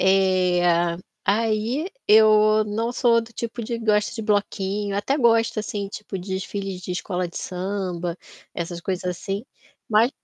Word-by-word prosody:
eh, 185 -2 +3 0.6
aí 225 - +1 0.2
eu 215 0 +6
não 220 +3 -2
sou 235 -2 +3
do 230 +1 -11
tipo 235 0 -4
de 235 +1 -3
gosta 210 -1 +1
de 225 - -4
bloquinho, 205 -1 -1
até 270 +7 0
gosto 230 -3 +3
assim 205 -2 -4
tipo 205 -1 -6
de 190 +1 -4
desfile 195 0 -4
de 180 - -5
escola 180 -1 -2
de - - -12
samba, 180 -2 -3 0.4
essas 170 0 -4
coisas 185 +1 -3
assim, 195 +4 -3 0.4
mas 225 +4 +4
205 Hz, 145 wpm, -23 LUFS, 190-220 Hz, 0.6 s, eu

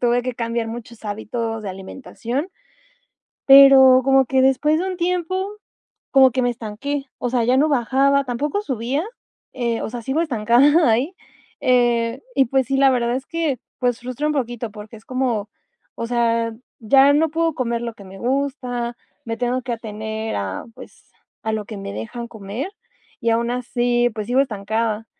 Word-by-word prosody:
Tuve 245 0 +2
que 255 0 -3
cambiar 230 0 -2
muchos 230 0 -9
hábitos 225 +2 -4
de 205 - -5
alimentación, 240 - -5 1.0
pero 270 -1 +8
como 270 0 +4
que 265 +1 +2
después 285 +4 +3
de 370 - -2
un 370 -1 -4
tiempo, 360 +2 -1 0.6
como 265 -2 +6
que 255 +1 0
me 245 - +2
estanqué, 245 +5 -4
o 245 - -3
sea, 245 -2 +1
ya 250 +2 +3
no 300 +3 +3
bajaba, 275 +2 +2
tampoco 280 +9 -2
subía, 265 - -2 0.5
eh, 235 -3 -1
o - - -3
sea, 235 +1 -6
sigo 265 +7 -1
estancada 275 +2 +4
ahí. 255 +11 +1 0.5
Eh, 240 -1 +2
y, 270 0 +4
pues 265 +1 +1
sí, 270 - 0
la 270 0 +5
verdad 240 -2 +1
es 265 - -5
que, 320 -6 -2 0.2
pues, 245 -2 0
frustra 255 +4 -4
un 305 - 0
poquito, 240 -4 -3
porque 210 +1 -11
es 220 - -17
como 250 -5 -1 0.5
o 230 - -3
sea, 230 -1 +1 0.3
ya 270 +5 +5
no 315 +1 +2
puedo 330 0 0
comer 235 -3 -1
lo 235 -1 -5
que 200 - -14
me 190 0 -12
gusta, 250 -1 -2 0.3
me 230 -1 -4
tengo 250 +1 -1
que 245 0 -4
atener 220 -1 -5
a, 100 -2 -4
pues, - - -15 0.3
a 220 - -2
lo 215 -1 -2
que 215 +1 -8
me 195 - -6
dejan 115 - -6
comer, 220 - -6 0.5
y 230 - +1
aun 235 +1 +1
así, 245 -1 0
pues, 215 -1 -5
sigo 250 +3 +2
estancada. 220 -2 -2
245 Hz, 175 wpm, -21 LUFS, 230-270 Hz, 1.0 s, pero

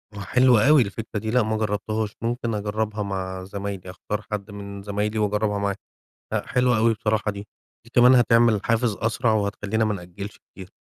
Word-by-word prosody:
آه - - -7
حلوة 125 +4 +4
أوي 150 -2 +7
الفكرة 110 0 -3
دي. 110 +1 -3
لا 125 0 +3
ما 110 0 -1
جربتهاش. 110 0 -2
ممكن 115 0 -2
أجربها 105 0 -2
مع 95 -1 -4
زمايلي، 100 -1 -6
أختار 105 +3 -4
حد 105 0 -4
من 100 -1 -8
زمايلي 105 +2 -2
وأجربها 105 0 0
معاه. 100 -1 -1 0.6
لا - - -1
حلوة 125 -2 +2
أوي 115 +1 +3
بصراحة 110 -1 0
دي. 100 +1 -8 0.4
دي 115 - -18
كمان 125 +1 +7
هتعمل 115 -3 +4
حافز 115 -2 +1
أسرع 115 +1 0
وهتخلينا 105 +1 0
ما 110 -1 0
نأجلش 100 +2 -8
كتير. 95 -1 -13
105 Hz, 175 wpm, -24 LUFS, 100-115 Hz, 0.6 s, أوي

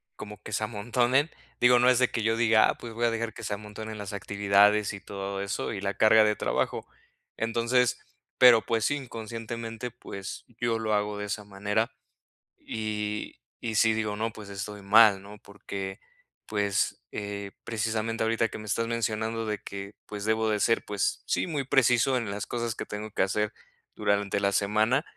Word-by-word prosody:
como 105 -1 -9
que 110 - -7
se 110 - 0
amontonen. 120 +7 +1 0.3
Digo, 125 0 +6
no 125 +1 +5
es 125 - +4
de 125 -1 +3
que 115 - -1
yo 110 +1 +1
diga: 115 -2 +5
"Ah, - - -1
pues 115 -1 -8
voy 120 +1 0
a 115 - +3
dejar 115 -1 -2
que 115 - -10
se 105 - -2
amontonen 105 +1 -8
las 100 -1 -6
actividades, 100 +1 +3
y 100 - -7
todo 100 0 -5
eso, 100 +2 -3
y 95 - -4
la 100 0 -2
carga 110 +1 +6
de 105 0 +2
trabajo". - - -1 0.5
Entonces, 115 +2 +1 0.4
pero 120 -3 +8
pues 115 -1 0
sí, 145 - +2
inconscientemente, 115 -2 -6
pues 100 -5 -8
yo 120 -1 +1
lo 110 -1 -1
hago 105 0 0
de 105 - -4
esa 105 +1 -3
manera. 105 +2 -1 0.7
Y 105 -1 -4 0.2
y 115 - -3
sí 110 +1 +5
digo: 110 -1 -1
"No, 110 +2 -2
pues 105 -2 -11
estoy 100 +1 -6
mal, 100 -1 +6
¿no?". 105 +1 -12
Porque, 100 -1 -7 0.5
pues, 100 -2 0
eh, 100 -1 -5
precisamente 115 0 -2
ahorita 115 0 +1
que - - -7
me 110 - -9
estás 115 +3 0
mencionando 115 -1 -1
de 105 - -1
que, 100 +1 -8
pues, 105 -1 -6
debo 110 0 +2
de 105 - +1
ser, 115 +2 +2
pues, 100 -1 -1
sí, - - 0
muy 150 -4 -1
preciso 130 -1 +3
en 115 -4 -3
las 100 0 -4
cosas 120 -2 -3
que - - -5
tengo 105 +1 -6
que - - +1
hacer 105 +2 0 0.4
durante 100 0 +1
la 100 0 +2
semana, 110 +7 +2
110 Hz, 190 wpm, -28 LUFS, 100-115 Hz, 0.7 s, pero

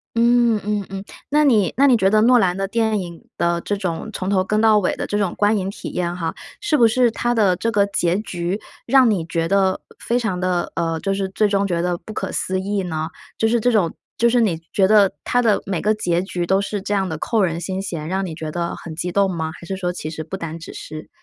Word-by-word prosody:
嗯， 235 -1 +4
嗯 205 -2 -1
嗯， 195 0 -6 0.3
那 300 +1 +3
你 215 - +3
那 280 - +5
你 255 -3 +6
觉 195 -3 +3
得 215 +1 +4
诺 245 +1 +6
兰 185 -2 +1
的 195 0 -1
电 220 -1 +1
影 170 -2 -8
的 170 0 +1
这 205 - -2
种 180 +1 -3
从 190 -1 -4
头 190 -2 +2
跟 210 +2 0
到 215 -1 +5
尾 185 - 0
的 - - -3
这 205 - -2
种 200 -4 0
观 210 +1 +3
影 190 0 -2
体 - - -7
验 175 -1 -2
哈， 165 -2 -3 0.3
是 410 -7 0
不 235 -5 +6
是 240 +1 +3
它 240 +1 -1
的 195 -5 +3
这 230 - -1
个 200 -2 +3
结 180 -2 +1
局， 180 -1 -3 0.3
让 260 -3 +5
你 180 -5 0
觉 165 0 -1
得 190 0 +2 0.2
非 240 - 0
常 215 -7 -1
的， 180 -1 -1
呃， 165 -1 -1
就 195 - 0
是 195 -1 -2
最 210 +2 +2
终 200 0 +1
觉 170 -2 0
得 175 -1 0
不 215 +5 -10
可 - - -3
思 185 0 -1
议 200 +1 -1
呢？ 160 -2 -3 0.3
就 225 - +2
是 235 +1 +2
这 245 +3 +2
种 190 -7 +2 0.2
就 235 - +4
是 240 0 +3
你 175 -7 +1
觉 195 -3 +4
得 205 -2 +5
它 245 - +1
的 220 -4 +2
每 185 -4 -1
个 215 +2 +2
结 175 -4 0
局 175 -3 -3
都 190 0 +3
是 200 0 -3
这 205 +1 -3
样 190 -1 0
的 160 -2 -4
扣 225 -3 +1
人 170 -1 -1
心 190 +2 -3
弦， 165 -5 -5
让 190 +2 -1
你 165 - -5
觉 155 -1 -5
得 170 0 -3
很 160 -2 -9
激 175 +2 -3
动 200 0 +2
吗？ 160 -3 -3
还 170 - -12
是 190 - -3
说 180 -1 -2
其 155 -3 -5
实 155 0 -5
不 165 +5 -6
单 165 -3 -5
只 165 - -10
是 155 0 -8
195 Hz, 280 characters per minute, -21 LUFS, 175-215 Hz, 0.3 s, 你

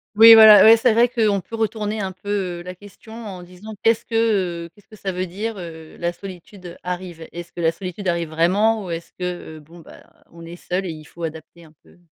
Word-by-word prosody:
Oui, 225 +1 +10
voilà. 220 -1 +9
Oui, 225 - +9
c'est 230 0 +2
vrai 235 +2 +4
qu'on 220 -5 +1
peut 210 +5 -9
retourner 215 -1 -2
un 190 -1 -3
peu, 185 +2 -11 0.3
heu, - - -11
la 180 - -7
question 205 +4 -15
en 205 -6 -8
disant: 185 +5 -11
«Qu'est-ce 225 0 +2
que, 200 -7 0
heu, - - -12
qu'est-ce 205 - -24
que 215 - -15
ça 195 -2 -4
veut 185 0 -3
dire, 215 +6 -5
heu, 160 -2 -10
la 175 0 -1
solitude, 185 0 -12
heu, 175 0 -9
arrive?». 180 -2 -6
Est-ce 175 0 -9
que 170 - -7
la 160 - +2
solitude 185 +2 -7
arrive 170 -2 -1
vraiment? 200 +7 +1
Ou 185 - -8
est-ce 170 0 -6
que, 180 -3 -5
heu, - - -11
bon, 165 +3 -16
bah, 165 - -15 0.3
on 170 0 -13
est 170 +1 -9
seul 180 +2 -4
et - - -5
il 155 -1 -11
faut 170 - -15
adapter 160 +1 -8
un 155 -1 -18
peu? - - -23
185 Hz, 240 wpm, -21 LUFS, 170-215 Hz, 0.3 s, Oui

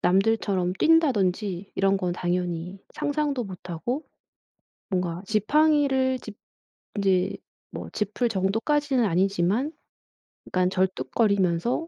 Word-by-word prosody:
남들처럼 195 -2 +2
뛴다든지 205 - +2
이런 195 0 +2
건 180 -2 -1
당연히 180 +1 -2
상상도 290 -4 -1
못하고 190 - -4 0.9
뭔가 180 -2 -1
지팡이를 265 +4 +3
짚 215 -3 -10 0.6
이제 190 -1 +2 0.4
뭐 - - -7
짚을 215 +3 -1
정도까지는 235 +7 +1
아니지만 195 - +1 0.7
그니까 185 0 +1
절뚝거리면서 190 - +1
200 Hz, 255 characters per minute, -25 LUFS, 180-255 Hz, 0.9 s, 지팡이를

